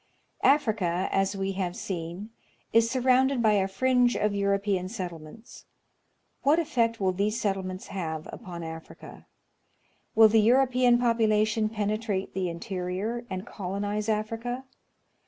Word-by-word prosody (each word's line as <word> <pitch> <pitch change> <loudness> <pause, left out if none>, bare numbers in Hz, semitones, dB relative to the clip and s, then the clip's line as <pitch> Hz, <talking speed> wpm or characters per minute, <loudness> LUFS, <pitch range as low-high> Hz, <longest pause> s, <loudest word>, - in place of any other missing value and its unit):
Africa, 210 - +2
as 195 +1 +1
we 195 0 -1
have 185 -2 -3
seen, 180 +4 -5 0.4
is 230 0 +4
surrounded 260 +1 +3
by 220 -2 +4
a 195 -2 +2
fringe 245 +4 +2
of 210 -1 0
Euro 200 0 +1
pean 195 -2 -2
settlements. 180 0 -8 0.8
What 290 +3 +4
effect 235 -9 0
will 190 -2 +2
these 205 +4 -1
settlements 190 -3 -3
have 160 -5 -4
upon 175 -6 -8
Africa? 160 0 -10 0.9
Will 220 0 +8
the 220 0 +4
European 250 +1 +4
population 220 -2 +2
penetrate 210 -2 -2
the 185 -1 -1
interior, 190 +6 -4
and 185 +2 -5
colonize 205 +1 -3
Africa 225 +4 -2
210 Hz, 125 wpm, -27 LUFS, 190-230 Hz, 0.9 s, Will